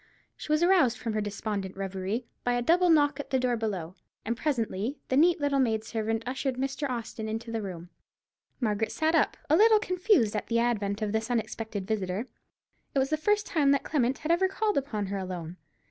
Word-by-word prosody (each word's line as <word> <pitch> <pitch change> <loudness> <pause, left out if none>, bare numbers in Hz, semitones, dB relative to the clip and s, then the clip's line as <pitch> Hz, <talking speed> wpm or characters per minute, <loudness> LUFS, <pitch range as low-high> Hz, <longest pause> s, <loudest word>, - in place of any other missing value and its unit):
She - - -7
was 305 +2 +3
aroused 345 -10 +4
from 230 -2 -3
her 215 - 0
despondent 205 -2 -4
reverie 195 +4 -3 0.2
by 245 - +1
a 245 - +1
double 350 +6 +4
knock 295 -3 +4
at 285 - -6
the 265 - +2
door 250 -1 +1
below, 195 -7 -3 0.3
and 230 +2 -1
presently 240 -2 -1
the 260 - +1
neat 340 +5 +5
little 285 -1 +1
maid 220 -4 +1
servant 225 0 -2
ushered 260 +1 -2
Mr. 270 +2 -2
Austin 225 -2 -4
into 225 +1 -4
the 225 -1 -2
room. 180 -3 -7 0.7
Margaret 220 -3 0
started 320 +1 +2
up, - - 0
a 305 - +4
little 435 +4 +6
confused 365 - +2
at 210 - -2
the 230 - +1
advent 215 -3 0
of 210 - -1
this 220 +2 -1
unexpected 220 -4 -3
visitor. 200 0 -2 0.7
It - - +1
was 270 +2 +1
the - - +4
first 415 +7 +1
time 295 -4 +2
that 280 - 0
Clement 260 -3 0
had 310 - -2
ever 360 +3 +3
called 420 +2 -1
upon 245 -7 -1
her 195 +1 -3
alone. 180 -2 -6
235 Hz, 205 wpm, -28 LUFS, 210-290 Hz, 0.7 s, little